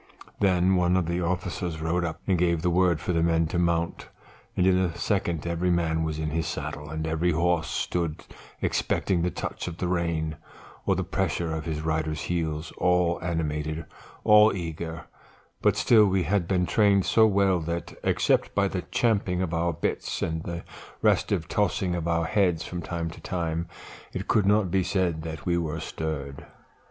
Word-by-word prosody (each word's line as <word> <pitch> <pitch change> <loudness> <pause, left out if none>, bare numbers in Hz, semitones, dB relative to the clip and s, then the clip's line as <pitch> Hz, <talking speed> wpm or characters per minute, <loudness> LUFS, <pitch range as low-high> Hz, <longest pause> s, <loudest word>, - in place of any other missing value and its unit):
"Then 95 -1 +3
one 90 +1 +3
of 90 - +1
the 85 +2 -1
officers 90 -1 -2
rode 85 +2 0
up 80 -2 -4
and 95 - +2
gave 85 -2 +1
the 90 - +2
word 90 -2 +3
for 90 - -2
the 85 - +2
men 85 0 +3
to 85 - -1
mount, 85 -1 0 0.5
and 90 - +3
in 95 -1 +5
a 90 -2 0
second 85 -3 -1
every 85 +1 0
man 80 -2 +1
was 80 -1 -2
in 80 -1 -2
his 80 0 -1
saddle, 75 0 -5
and 80 +1 -3
every 80 +2 0
horse 85 0 +1
stood 85 -3 -2 0.4
expecting 90 -3 0
the 90 - +1
touch - - -5
of 85 -1 -5
the 90 - -2
rein, 85 -3 -1 0.5
or - - +3
the - - -1
pressure 85 -2 -1
of 80 -1 -4
his 80 -2 -3
rider's 80 -1 -1
heels, 80 -2 -2
all 90 -1 +2
animated, 80 -2 -2 0.4
all 105 0 +7
eager; 80 -2 -5 0.6
but - - +3
still 110 -3 +5
we 95 -1 +1
had 90 +1 0
been 90 -1 +1
trained 100 -1 +3
so 110 -1 +5
well 100 -3 +3
that, 85 +1 -4
except - - +1
by 100 -1 +3
the 95 -1 -3
champing 100 -6 +1
of 85 -2 -3
our 85 +1 +1
bits, 80 - -2
and 80 0 -2
the 85 -1 -5 0.4
restive 80 - +2
tossing 95 -3 0
of 85 -1 -2
our 85 0 +1
heads 90 -5 +1
from 90 -1 -5
time 85 +1 -3
to - - -12
time, 85 -2 -2 0.5
it - - -4
could 105 -3 +3
not 105 -3 +3
be 95 - +3
said 90 -4 0
that 80 0 -7
we 85 -1 +2 0.2
stirred. 75 -3 -5
85 Hz, 185 wpm, -26 LUFS, 80-90 Hz, 0.6 s, all